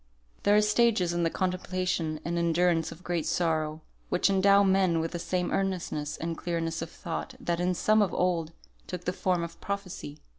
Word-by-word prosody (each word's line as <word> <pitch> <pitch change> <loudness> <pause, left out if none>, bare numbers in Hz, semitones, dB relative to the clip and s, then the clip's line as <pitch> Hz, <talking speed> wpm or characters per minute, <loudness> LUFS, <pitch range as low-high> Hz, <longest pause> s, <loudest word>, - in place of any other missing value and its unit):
There 205 - +4
are 210 - +5
stages 210 -5 +3
in 175 - 0
the 165 - +2
contemplation 185 -3 -1
and 170 +1 -1
endurance 170 0 +2
of 175 - -12
great 175 -3 -1
sorrow, 155 -2 0 0.3
which 185 - +2
endow 200 +1 +5
men 190 -3 +3
with 165 0 -2
the 175 - -4
same 175 +1 -1
earnestness 180 -6 -2
and 165 0 -3
clearness 165 -1 -2
of 165 - -4
thought 175 +12 -5
that 175 -9 -1
in 180 +1 +1
some 215 +5 +3
of 200 - +2
old 170 -3 0 0.4
took 180 -1 -6
the 180 - 0
form 180 -2 0
of 170 0 -8
Prophecy. 200 -7 -5
175 Hz, 185 wpm, -28 LUFS, 165-190 Hz, 0.4 s, are